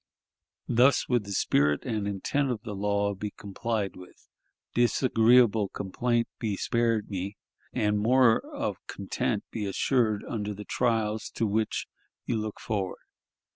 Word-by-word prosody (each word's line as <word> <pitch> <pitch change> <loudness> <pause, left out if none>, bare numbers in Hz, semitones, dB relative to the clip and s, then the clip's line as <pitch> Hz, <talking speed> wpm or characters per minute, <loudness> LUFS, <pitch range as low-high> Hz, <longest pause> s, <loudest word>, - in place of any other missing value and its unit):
Thus 125 +4 +4
would 120 -4 +1
the 100 - -7
spirit 75 -6 +2
and 110 -4 -1
intent 130 +8 0
of 115 -3 -3
the 105 -4 -5
law 100 0 0
be 105 +2 -4
complied 100 +1 -3
with, 90 0 -14 0.5
disagreeable 120 -3 +4
complaint 115 +4 -1
be 105 -4 -1
spared 115 -3 0
me, 100 +1 -4 0.3
and 105 0 +1
more 120 +1 +5
of 290 -1 -4
content 105 +3 -2
be 105 -3 -3
assured 110 0 +1
under 105 -2 -3
the 105 +1 -8
trials 110 -2 0
to 115 - +1
which 110 +1 0 0.4
you 120 - -1
look 110 -1 -3
forward. 100 -4 -3
110 Hz, 135 wpm, -28 LUFS, 100-120 Hz, 0.5 s, more